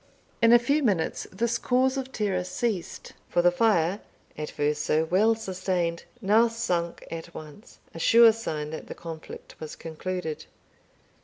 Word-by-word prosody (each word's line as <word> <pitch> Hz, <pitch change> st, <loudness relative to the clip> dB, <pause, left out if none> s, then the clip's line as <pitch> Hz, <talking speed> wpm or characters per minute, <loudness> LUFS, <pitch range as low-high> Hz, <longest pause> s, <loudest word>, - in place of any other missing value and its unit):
In 230 Hz, 0 st, +6 dB
a 240 Hz, -, +9 dB
few 280 Hz, +6 st, +1 dB
minutes 195 Hz, -, 0 dB
this 235 Hz, +4 st, -1 dB
cause 260 Hz, +2 st, +2 dB
of 265 Hz, -1 st, -4 dB
terror 200 Hz, -7 st, -1 dB
ceased, 190 Hz, 0 st, -3 dB, 0.2 s
for 175 Hz, -, +2 dB
the 175 Hz, -, +6 dB
fire, 185 Hz, -2 st, +2 dB, 0.4 s
at 150 Hz, 0 st, -5 dB
first 150 Hz, 0 st, -1 dB
so 155 Hz, +1 st, +2 dB
well 210 Hz, +7 st, +3 dB
sustained, 185 Hz, -5 st, -2 dB, 0.2 s
now 220 Hz, +3 st, +4 dB
sunk 180 Hz, -8 st, -2 dB
at 165 Hz, +1 st, -7 dB
once 155 Hz, +8 st, -11 dB, 0.2 s
a 165 Hz, -, -8 dB
sure 230 Hz, +6 st, +7 dB
sign 155 Hz, -9 st, -4 dB
that 160 Hz, -, -7 dB
the -, -, -7 dB
conflict 165 Hz, -2 st, -9 dB
was 155 Hz, -1 st, -7 dB
concluded. 165 Hz, 0 st, -5 dB
185 Hz, 155 wpm, -26 LUFS, 165-230 Hz, 0.4 s, a